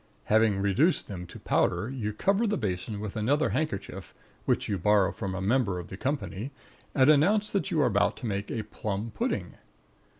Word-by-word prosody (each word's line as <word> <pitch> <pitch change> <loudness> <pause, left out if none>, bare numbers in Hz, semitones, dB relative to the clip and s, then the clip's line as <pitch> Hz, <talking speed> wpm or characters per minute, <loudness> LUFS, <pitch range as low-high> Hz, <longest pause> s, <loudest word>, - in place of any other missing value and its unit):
Having 105 -2 +3
reduced 130 - +2
them 90 -3 -6
to - - -11
powder, - - +1
you 120 -5 -3
cover 195 - +1
the 210 - 0
basin 100 0 -3
with 105 0 -5
another 140 +8 +2
handkerchief, 100 - -3 0.3
which - - +1
you 100 -2 -1
borrow 100 +1 +4
from 100 -3 -4
a 95 - -3
member 105 -2 +1
of 90 -2 -7
the - - -6
company, 105 - -3 0.5
and 130 -1 +5
announce 200 +9 +4
that 200 - 0
you 160 - 0
are - - +4
about 100 -5 +2
to 125 - -7
make 100 -2 -2
a 110 - -2
plum 105 +2 -4
pudding. 100 - -2
105 Hz, 190 wpm, -28 LUFS, 100-135 Hz, 0.5 s, and